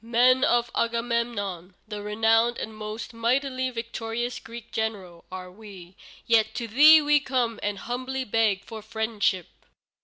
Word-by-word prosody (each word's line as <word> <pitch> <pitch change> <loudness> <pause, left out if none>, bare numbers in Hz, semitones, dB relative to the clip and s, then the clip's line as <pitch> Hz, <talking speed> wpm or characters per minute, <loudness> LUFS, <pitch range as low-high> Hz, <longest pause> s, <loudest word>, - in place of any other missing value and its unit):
Men 250 +3 +4
of 240 -2 +2
Agamemnon, 230 -6 -2
the 210 -1 -6
renowned 225 +3 +2
and 220 - -6
most 215 +1 -7
mightily 255 +3 0
victorious 230 0 -4
Greek 235 0 -11
general, 195 -6 -4
are 185 -1 -7
we, 190 -3 -13 0.3
yet 225 -1 +2
to 240 -2 -3
thee 300 +7 +7
we 295 0 +4
come 250 -5 -1
and 205 0 -2
humbly 255 +4 -4
beg 215 -4 +1
for 220 -1 -8
friendship." 215 -4 -1
230 Hz, 140 wpm, -26 LUFS, 210-240 Hz, 0.3 s, thee